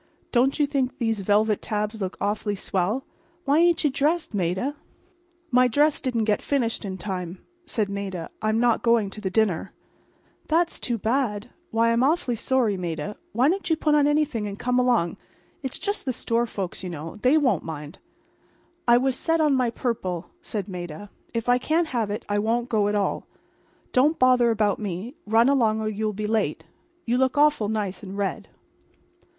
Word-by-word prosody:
Don't 260 +2 +3
you 295 - +3
think 275 -3 -1
these 225 -3 0
velvet 205 +2 +2
tabs 210 0 -3
look 190 0 -3
awful 205 0 -1
swell? 200 +6 -1 0.4
Why 285 +2 +4
ain't 340 0 +3
you 295 - +3
dressed, 310 +2 0
Maida?" 190 - -1 0.8
"My 250 0 +5
dress 290 +5 +2
didn't 245 -4 0
get 210 -1 +1
finished 245 -6 -1
in 190 -2 -4
time," 180 -1 -4 0.3
said 220 -8 0
Maida. 195 -4 -4
"I'm 215 +1 +1
not 240 -1 +3
going 230 -4 +2
to 210 - -8
the 190 - -1
dinner." 195 -3 0 0.7
"That's 335 +2 +1
too 240 -2 -2
bad. 220 -2 -1 0.2
Why, 230 +1 +2
I'm 230 +1 +2
awfully 280 -3 +2
sorry, 235 -3 +1
Maida. 175 +2 -4 0.2
Why 245 +6 +3
don't 360 +2 0
you 320 - +4
put 305 -1 +1
on 295 -1 +4
anything 295 -8 +1
and 200 0 -6
come 250 +2 +1
along—it's 250 - -2
just 405 +1 -3
the 260 - 0
store 235 0 0
folks, 195 -5 -5
you 185 - -4
know, 165 -1 -6
and 210 - -15
they 260 +5 +5
won't 285 -5 +2
mind." 150 +1 -7 0.9
"I 240 0 +7
was 260 +1 +1
set 325 +4 0
on 305 -2 +3
my 255 -2 +2
purple," 190 -8 -3
said 210 - -4
Maida. 180 +1 -7 0.2
"If 230 0 -3
I 245 0 +4
can't 320 +4 +1
have 230 -4 -1
it 205 - -4
I 205 0 0
won't 235 +3 0
go 210 -3 +2
at 205 - 0
all. 200 -1 -1 0.7
Don't 290 +6 +4
bother 255 -2 +4
about 210 -2 +1
me. 205 +3 -4
Run 225 +3 +4
along 230 -6 +3
or 220 - -2
you'll 215 0 -1
be 210 +1 -4
late. 210 -8 -1 0.4
You 245 +2 +1
look 260 +2 +1
awful 290 -8 +3
nice 210 -3 -2
in 195 -2 -8
red." 200 -1 -2
225 Hz, 185 wpm, -25 LUFS, 205-260 Hz, 0.9 s, I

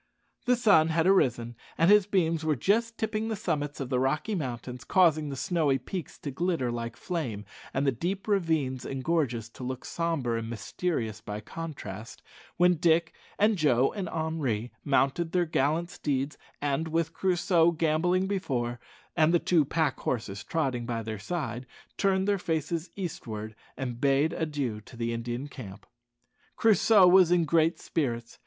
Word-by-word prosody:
The 250 0 +4
sun 205 -10 +5
had 165 0 +1
arisen, 120 -11 +2 0.2
and 165 +4 +5
his 210 -2 +6
beams 165 -5 +1
were 155 -1 +1
just 225 - +1
tipping 220 0 -1
the 225 - -1
summits 150 -6 -2
of 135 -3 -4
the 125 -2 +1
Rocky 150 - 0
Mountains, 125 - -4
causing 160 -5 +3
the 140 - -4
snowy 150 -2 +1
peaks 170 +6 -6
to 145 - -4
glitter 160 -4 -1
like 115 -1 -5
flame, 125 - -4 0.3
and 135 +2 0
the 135 - +4
deep 185 - -3
ravines 160 - 0
and 135 -1 -5
gorges 130 -9 0
to 125 - -11
look 130 0 -5
sombre 150 -9 -1
and 115 0 -6
mysterious 115 - -3
by 105 0 -5
contrast, 115 -5 -8 0.3
when 180 0 +4
Dick 165 0 +2 0.2
and 210 -1 +3
Joe 135 -4 +3
and 190 -4 -4
Henri 145 -9 -2
mounted 145 +4 +1
their 180 -1 +3
gallant 160 +2 0
steeds, 140 0 -2 0.2
and, 145 +2 -1
with 165 0 -1
Crusoe 175 -2 +3
gambolling 170 +3 +1
before, 130 -12 -2 0.4
and 160 -1 +4
the 175 - +5
two 170 -2 +3
pack 155 0 0
horses 105 -5 -3
trotting 130 -7 -1
by 115 -2 -2
their 110 -1 -5
side, 130 0 -4 0.3
turned 190 -1 +1
their 200 -1 +2
faces 160 0 -2
eastward, 110 - -5 0.2
and 125 -2 -4
bade 140 +3 +3
adieu 145 -10 -2
to 120 - -14
the 115 0 -1
Indian 120 +4 -4
camp. 110 -9 -10 0.7
Crusoe 215 -2 +5
was 180 -1 +7
in 175 -1 +3
great 160 +1 +2
spirits. 120 -7 -3
155 Hz, 160 wpm, -28 LUFS, 125-175 Hz, 0.7 s, was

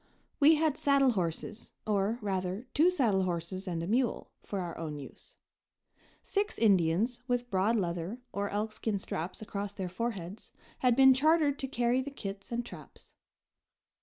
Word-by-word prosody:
We 310 +2 +7
had 310 -2 +1
saddle 280 -2 +4
horses, 185 +2 -3
or, 210 +1 +1
rather, 190 +2 -2
two 325 +4 +5
saddle 235 - +2
horses 185 +1 -3
and 170 -2 -2
a - - -4
mule, 240 +3 0
for 200 - -4
our 175 -2 -4
own 155 -2 -5
use. 140 - -12 0.9
Six 410 +1 -1
Indians, 200 +3 +3
with 245 -1 -1
broad 195 +4 +2
leather 175 +2 -2
or 200 0 -1
elkskin 215 0 -2
straps 180 +2 -5
across 200 -1 -4
their 190 -3 -4
foreheads, 195 -1 -5 0.3
had 250 -2 +3
been 265 0 +8
chartered 295 +1 +3
to 270 - -2
carry 245 0 +1
the 275 - -5
kits 195 -7 -7
and 235 0 -2
traps. - - -13
210 Hz, 155 wpm, -31 LUFS, 185-255 Hz, 0.9 s, been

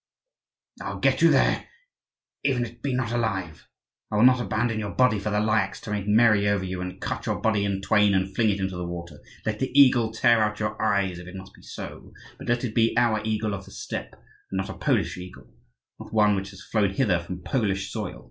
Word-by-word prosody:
"I'll - - -5
get - - +2
you - - +7
there, - - +2 0.8
even 130 -3 +1
if 115 - -8
it 120 0 -23
be 135 -1 -1
not 120 -4 -1
alive! 95 -9 -2 0.4
I - - -1
will 105 - +4
not 125 0 +6
abandon 115 0 -1
your 105 -2 -3
body 125 -5 +3
for 105 +2 -3
the 105 0 +1
Lyakhs 105 -2 +1
to 105 - -7
make 105 -1 -2
merry 105 -1 +4
over 100 -2 0
you, 90 -1 -4
and 90 0 -6
cut - - -4
your - - -1
body 110 -2 +1
in 100 -1 -1
twain 105 -1 +3
and 95 0 -1
fling 115 -2 +3
it 100 -1 0
into 95 -1 -2
the 90 0 -4
water. 85 -3 -7 0.3
Let 110 -1 -2
the 130 - -1
eagle 125 -5 +5
tear 115 0 +3
out 105 0 0
your 110 0 -3
eyes 100 -4 +1
if 90 - -10
it 90 - -10
must 95 0 -10
be - - -18
so; - - -9 0.3
but - - -9
let 120 +1 +1
it 115 -4 -3
be 115 0 +2
our 115 -3 +3
eagle 110 -1 -1
of 100 -1 -6
the 100 - -14
steppe - - -6
and 95 - -10
not 95 0 -2
a - - -4
Polish - - 0
eagle, 90 0 -10 0.5
not - - -10
one 105 -2 +4
which 95 0 -4
has 100 0 -12
flown 105 -3 +1
hither 95 -8 +2
from 90 +1 -7
Polish 100 -6 -1
soil. - - -5
105 Hz, 235 wpm, -25 LUFS, 95-115 Hz, 0.8 s, you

